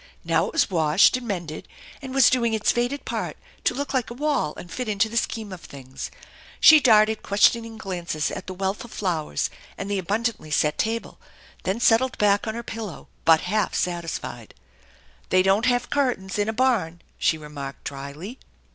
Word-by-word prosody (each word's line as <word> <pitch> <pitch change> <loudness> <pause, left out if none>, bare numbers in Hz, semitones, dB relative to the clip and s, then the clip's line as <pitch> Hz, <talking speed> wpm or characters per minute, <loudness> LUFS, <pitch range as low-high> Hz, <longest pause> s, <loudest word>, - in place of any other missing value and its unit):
Now - - +1
it - - -7
was 325 - +2
washed 160 +4 +4
and 255 -2 -5
mended, 170 -6 -4 0.3
and 265 -2 -7
was 270 -1 +5
doing 235 -3 +2
its 215 - +2
faded 245 +4 -1
part - - -3 0.3
to - - +2
look 280 +1 -3
like 255 -3 0
a 235 - -7
wall 285 - 0
and 175 - -10
fit 250 -3 -4
into 210 +1 +1
the 230 - -8
scheme 220 -3 -2
of 180 - -9
things. 130 -1 -8 0.5
She 310 -1 +9
darted 220 -4 +4
questioning 225 +3 +2
glances 175 -6 -3
at - - -6
the 185 - -5
wealth 190 +2 -2
of 235 - -11
flowers, 165 - -2 0.3
and 200 +1 -4
the 200 - 0
abundantly 205 -1 -2
set 150 +1 +1
table, 230 +1 -2 0.5
then 195 +4 0
settled 240 +2 +3
back 205 +1 +2
on 220 - -2
her 235 - -5
pillow 220 -8 -7 0.2
but 160 -1 +6
half 210 +4 0
satisfied. 165 -9 -4 0.4
" - - -30
They 185 0 +4
don't 195 +5 +3
have 245 -1 +1
curtains 245 -9 0
in 205 +1 +1
a - - +1
barn! 220 -9 0
" - - -37
she 160 - +2
remarked 145 -3 -8
dryly. 145 - -7
205 Hz, 190 wpm, -24 LUFS, 170-235 Hz, 0.5 s, She